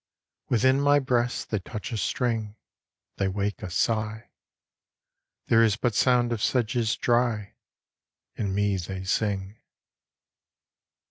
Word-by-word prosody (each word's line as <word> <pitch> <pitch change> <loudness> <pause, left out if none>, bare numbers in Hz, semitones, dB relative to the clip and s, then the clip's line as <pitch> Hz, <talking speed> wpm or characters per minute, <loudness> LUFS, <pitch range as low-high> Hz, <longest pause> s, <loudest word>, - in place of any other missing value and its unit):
Within 130 +3 +3
my 145 0 +5
breast 125 -3 0
they 110 - +1
touch 105 +5 -7
a 115 - -2
string, 110 -2 -1 0.6
They 100 - +1
wake 100 +1 -2
a - - -5
sigh. 110 +4 -1 1.1
There 115 0 +5
is 110 -2 +2
but 120 0 0
sound 120 +2 +3
of 110 - -4
sedges 115 -2 +1
dry; 120 -4 0 0.8
In 100 -3 -2
me 100 -1 +1
they 95 +1 -5
sing. 100 +1 -2
110 Hz, 120 wpm, -26 LUFS, 100-120 Hz, 1.1 s, my